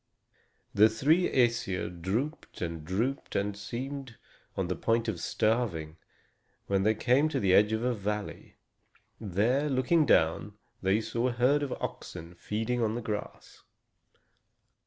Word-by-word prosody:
The 105 +2 +6
three 155 +11 +2
Æsir 115 -8 0
drooped 125 - -3
and 85 -3 -4
drooped, 115 - -2
and 100 0 0
seemed 125 +4 -6 0.4
on 95 -2 0
the 90 - -1
point 115 +5 0
of 105 -6 -2
starving, 90 -8 -1 0.7
when 100 -1 +1
they 110 +3 +3
came 130 +7 +3
to - - -1
the 95 -2 +2
edge 105 +2 +5
of 110 +1 -1
a 125 0 +1
valley. 105 -1 -5 0.6
Here, 115 +9 +1
looking 140 +4 +2
down, 85 +3 +2 0.2
they 95 +3 +2
saw 115 +2 -1
a - - 0
herd 130 +5 +3
of 140 -3 -2
oxen 85 -1 -6
feeding 110 +7 -2
on 110 -1 0
the 120 - -3
grass. 105 -2 -6
110 Hz, 140 wpm, -29 LUFS, 95-125 Hz, 0.7 s, The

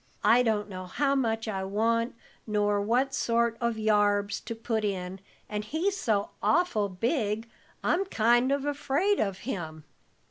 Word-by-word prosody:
"I 240 +2 +6
don't 220 -4 0
know 185 -2 -7
how 275 +9 +1
much 225 -4 0
I 195 -3 -2
want, 230 +5 0 0.3
nor 205 -1 +1
what 250 +6 +1
sort 235 0 +1
of 235 -1 0
yarbs 205 -1 +2
to 230 - -4
put 225 -1 -2
in, 190 -2 -3 0.3
and 210 0 -3
he's 325 - -1
so 210 - 0
awful 300 - +2
big, 220 - -1 0.4
I'm 385 +3 +2
kind 240 - +3
of 280 0 0
afraid 290 +7 +1
of 195 -2 -1
him." 160 - -5
225 Hz, 150 wpm, -28 LUFS, 205-250 Hz, 0.4 s, I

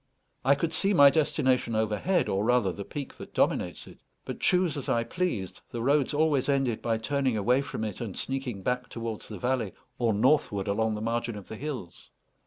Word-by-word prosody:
I 135 +2 +5
could 160 +3 -2
see 200 0 +2
my 140 -3 +8
destination 130 -5 +1
overhead, 110 - +1
or 95 +1 0
rather 120 -4 +3
the 100 - -6
peak 140 +6 -6
that - - -10
dominates - - 0
it, - - -14 0.3
but - - -5
choose 180 -3 +2
as 140 - -4
I 115 - +2
pleased, 115 - -3
the 115 -1 -4
roads 140 +1 +3
always 145 -3 +2
ended 135 -5 +1
by 115 -1 0
turning 130 +1 0
away 125 +6 +3
from 140 - -5
it, 105 -1 -4
and 110 -6 -5
sneaking 130 -7 -4
back 125 +2 -1
towards 115 -2 -5
the 105 - -7
valley, 120 -2 -1 0.3
or 120 -2 +2
northward 105 -3 +2
along 110 +2 +1
the 105 - -5
margin 115 0 -2
of 100 - -11
the - - -6
hills. 125 - -7
125 Hz, 195 wpm, -28 LUFS, 110-140 Hz, 0.3 s, my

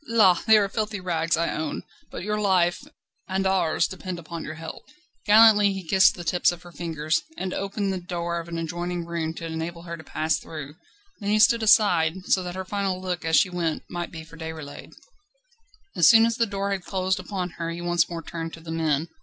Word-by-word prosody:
La! 220 -5 +5
they 220 0 +8
are 205 -1 +3
filthy 210 0 -3
rags, 165 -3 0
I 170 0 0
own, 155 -1 -3 0.3
but - - -7
your 210 +1 -1
life 180 -4 +2
and 290 +2 -17 0.4
and 190 0 -1
ours 175 -4 +2
depend 185 -1 -6
upon 170 0 -7
your 155 - -6
help." 160 0 -8 0.5
Gallantly 210 -1 +7
he 190 -3 -7
kissed 190 +3 +5
the 175 - -7
tips 175 +2 +2
of 175 0 -9
her 175 - -12
fingers, 160 - -1 0.2
and 185 -1 -3
opened 195 0 -2
the 185 - -3
door 170 -1 -3
of 165 - -8
an 170 -1 -5
adjoining 175 +1 -3
room 165 -1 -3
to 165 - -6
enable 165 +1 -5
her 170 -1 -6
to 160 - -12
pass 155 0 0
through; 150 -3 -8 0.5
then 205 -2 -3
he 210 - +3
stood 220 +2 +5
aside, 185 -5 +3
so 190 - +2
that 180 0 -6
her 190 0 -5
final 195 -1 -2
look, 180 -2 -4
as 160 0 +1
she 185 - +4
went, 170 -3 -2
might 175 0 -4
be 160 -1 -8
for 165 +1 -15
Déroulède. 160 -3 -8 1.0
As - - +6
soon 225 -1 +7
as 230 0 0
the 230 - +2
door 200 0 -2
had 195 -2 -2
closed 190 +1 -1
upon 185 -3 -4
her 165 - -2
he 170 +1 -5
once 175 -1 +1
more 170 -1 -5
turned 165 0 -6
to - - -9
the 165 0 -8
men. 160 -1 0
175 Hz, 220 wpm, -25 LUFS, 165-195 Hz, 1.0 s, they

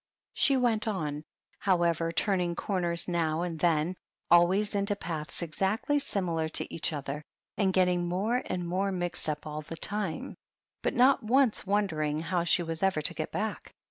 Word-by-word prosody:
She 275 -2 +3
went 230 -3 +1
on, 150 -8 -2 0.4
however, 170 -3 +1
turning 180 -1 0
corners 175 -3 +1
now 165 -2 0
and 170 -3 -4
then, 165 +1 +2 0.4
always 185 +5 +5
into 200 0 0
paths 160 -4 -4
exactly 195 - 0
similar 170 - -1
to - - -3
each 165 - -1
other, 145 0 -4 0.3
and 195 -3 +2
getting 180 -2 +2
more 210 +8 0
and 180 -1 -3
more 190 +3 0
mixed 175 -3 -1
up 150 -1 -3
all 155 0 -5
the 165 +2 -8
time, 205 +5 -2 0.4
but - - -1
not 260 +3 +5
once 240 -1 +2
wondering 160 -7 0
how 170 +1 -1
she 175 +1 +3
was 165 -1 -5
ever 190 -6 +1
to 170 - 0
get 155 - -4
back. 215 +1 -4
175 Hz, 165 wpm, -29 LUFS, 165-200 Hz, 0.4 s, always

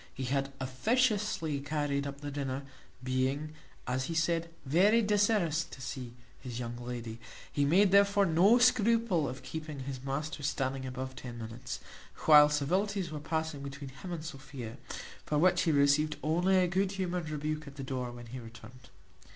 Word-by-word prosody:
He 130 - -4
had 135 +2 0
officiously 200 - +1
carried 145 -1 -1
up 140 0 -7
the 145 0 -5
dinner, 135 -1 -3 0.4
being, 130 +4 -1 0.3
as 130 +1 -1
he 165 - -4
said, 165 +1 +1 0.2
very 200 +11 +4
desirous 205 -6 +2
to 165 - -12
see 125 -2 -6 0.3
his 125 -3 -6
young 120 -1 -4
lady; 120 -2 -6 0.3
he 145 - +1
made 185 +6 +5
therefore 200 0 +5
no 185 +7 +5
scruple 230 - +3
of 130 +1 -8
keeping 155 -3 -6
his 130 -1 -6
master 145 +3 -3
standing 135 -2 -1
above 130 0 -5
ten 120 -2 -8
minutes, 120 +1 -6 0.4
while 150 -1 +9
civilities 180 +5 0
were 155 - -4
passing 160 -1 -2
between 140 0 -7
him 135 +8 -9
and 165 -2 -5
Sophia, 135 -6 -7 0.5
for 150 - -1
which 180 +4 +4
he 165 - +2
received 145 +1 +3
only 175 +5 +3
a 185 - +4
good 190 +2 0
humoured 180 -4 -2
rebuke 155 0 -3
at 140 - -10
the 140 - -6
door 130 -2 -3
when 120 0 -9
he 125 +3 -7
returned. 115 +2 -13
145 Hz, 165 wpm, -31 LUFS, 130-175 Hz, 0.5 s, while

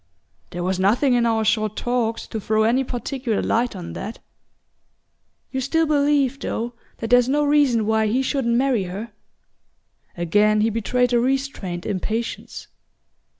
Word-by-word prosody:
"There 175 0 -5
was 185 +1 -1
nothing 240 +8 +3
in 240 -1 +3
our 220 -1 +1
short 215 -1 +1
talks 240 -2 -1
to 220 - -4
throw 215 +1 +1
any 240 +4 +2
particular 245 -2 -3
light 235 -1 0
on 175 -3 -7
that." 215 +3 -6 1.3
"You 265 - -2
still 325 +5 +1
believe, 285 -3 +2
though, 235 -1 -3 0.2
that 225 - -5
there's 245 0 +5
no 295 +2 +2
reason 285 -7 +3
why 220 0 +2
he 250 +5 +1
shouldn't 260 -4 0
marry 250 -5 +1
her?" 200 +6 -6 1.1
Again 210 +5 +3
he 225 +1 +2
betrayed 245 +3 0
a 240 - +4
restrained 250 -9 -2
impatience. 220 +4 -4
235 Hz, 150 wpm, -22 LUFS, 215-265 Hz, 1.3 s, there's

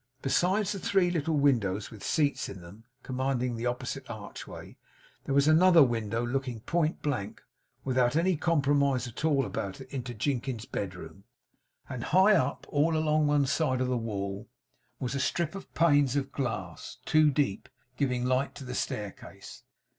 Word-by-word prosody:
Besides 185 +8 +2
the 200 - -3
three 180 -1 +2
little 160 -2 0
windows, 110 -9 +1
with 105 -3 -11
seats 145 -3 0
in 95 - -9
them, 95 +7 -13 0.2
commanding 130 -1 -1
the 115 +2 -2
opposite 120 0 -4
archway, - - -9 0.5
there 140 - -1
was 140 +1 +4
another 165 +1 +7
window 115 -2 -1
looking 125 -2 -3
point 165 +4 -1
blank, 130 -9 -2 0.4
without 125 0 +1
any 175 +3 +3
compromise 140 -5 +2
at 120 - -8
all 145 -4 +2
about 95 -5 -4
it 135 - -10
into 125 -2 -4
Jinkins's 120 0 -2
bedroom; 90 -1 -6 0.6
and 125 -2 -5
high 190 +5 +5
up, 145 -8 0
all 155 +2 +2
along 155 -1 +2
one 145 -1 +3
side 130 -2 +1
of 130 0 0
the 125 - +1
wall 100 -3 -4 0.5
was 125 0 -3
a 140 - -1
strip 165 +4 0
of 195 - -9
panes 145 -5 +4
of 135 -1 -1
glass, 105 -12 -4
two 155 -1 +5
deep, 140 -8 -1 0.3
giving 125 -2 0
light 130 +2 0
to - - -8
the 125 -1 -6
staircase. 105 -5 -6
135 Hz, 160 wpm, -29 LUFS, 120-155 Hz, 0.6 s, another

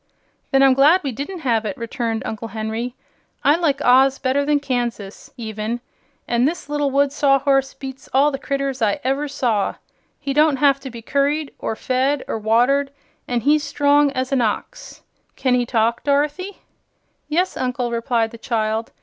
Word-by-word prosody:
"Then 270 -1 +4
I'm 270 -1 +6
glad 295 +7 +5
we 275 - -2
didn't 290 - -6
have 230 -6 +1
it," 225 +6 -4
returned 230 -1 -3
Uncle 220 +1 -5
Henry. 225 +3 -4 0.5
"I 290 - +5
like 320 -5 0
Oz 265 +2 +5
better 275 +1 0
than 290 0 +2
Kansas, 240 -7 -4
even; 220 0 -4 0.5
an' 240 +1 +2
this 325 +2 -2
little 290 -1 0
wood 280 +1 +2
Sawhorse 275 -1 +2
beats 270 -1 -9
all 280 +3 +4
the 270 - -4
critters 275 -2 -3
I 220 +5 +1
ever 270 +3 0
saw. 235 -7 0 0.4
He 275 - -3
don't 300 0 +4
have 275 0 +3
to 270 - -8
be 235 -2 -10
curried, 285 +3 0
or 225 - -3
fed, 260 +4 0
or 225 - -3
watered, 245 +6 +2 0.4
an' 245 -1 -1
he's 295 +4 +3
strong 290 0 +3
as 260 0 -2
an 270 -2 +2
ox. 230 - -4 0.3
Can 255 -2 +1
he 245 -1 +1
talk, 230 0 +1
Dorothy?" 295 +7 -1 0.7
"Yes, 355 +5 0
Uncle," 250 -1 -2
replied 230 -1 0
the 230 - -11
child. 220 -1 -2
265 Hz, 170 wpm, -21 LUFS, 235-285 Hz, 0.7 s, I'm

